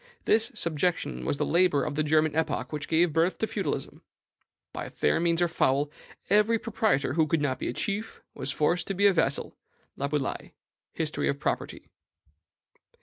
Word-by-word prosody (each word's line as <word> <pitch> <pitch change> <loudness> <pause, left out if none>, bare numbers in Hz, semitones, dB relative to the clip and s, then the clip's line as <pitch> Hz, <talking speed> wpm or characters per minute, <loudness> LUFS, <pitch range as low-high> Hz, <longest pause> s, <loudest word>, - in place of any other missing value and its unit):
This 220 0 +3
subjection 155 - -1
was - - 0
the - - 0
labor 170 -4 +3
of 150 - -3
the 150 - 0
German 155 0 +2
epoch 160 -1 -1
which 150 -1 -4
gave 165 0 +3
birth 165 +3 +2
to - - 0
feudalism. 205 -3 -4 0.7
By - - -5
fair 75 - +1
means 170 0 +2
or - - +3
foul, 145 -3 +1 0.4
every 210 +3 +4
proprietor 215 - 0
who 160 0 +2
could 160 +1 +1
not 130 -3 -1
be - - -3
a - - -2
chief 210 - -3
was 135 - -5
forced 170 +4 0
to 195 - -2
be 200 +2 +2
a 200 - +6
vassal." 140 -5 0 0.4
(Laboulaye: 140 -1 -3 0.4
History 155 -2 -2
of 140 - -2
Property.) - - -3
160 Hz, 170 wpm, -27 LUFS, 145-180 Hz, 0.7 s, a